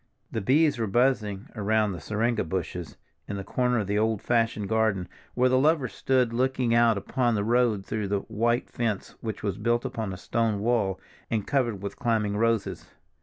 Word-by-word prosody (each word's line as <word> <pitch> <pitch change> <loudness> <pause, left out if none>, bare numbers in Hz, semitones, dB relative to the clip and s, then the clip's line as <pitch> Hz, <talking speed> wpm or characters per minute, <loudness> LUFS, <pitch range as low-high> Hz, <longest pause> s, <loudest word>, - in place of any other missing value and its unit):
The 110 - -2
bees 145 +5 +3
were 110 - 0
buzzing 105 -3 +1
around 110 0 +1
the 90 - -5
syringa 115 +1 0
bushes 90 0 -4 0.3
in 100 - -4
the 100 - -4
corner 125 +4 0
of 105 - 0
the 100 +2 0
old 110 -1 +1
fashioned 115 -3 0
garden, 110 -4 +1 0.3
where 125 +1 +4
the 130 0 +3
lovers 145 -3 +2
stood 125 -3 +1
looking 130 -1 +1
out 115 -2 +4
upon 120 +3 0
the 100 - 0
road 115 -3 +2
through 105 -2 -2
the 100 0 0
white 115 +4 0
fence 115 -5 -3
which 110 -2 -5
was 100 -2 -2
built 120 0 +1
upon 110 -4 -3
a 95 - -6
stone 115 +2 0
wall, 105 -4 +1 0.3
and 110 -3 -1
covered 120 -8 0
with 100 - -5
climbing 110 -3 +1
roses. 115 -1 0
110 Hz, 185 wpm, -27 LUFS, 100-120 Hz, 0.3 s, where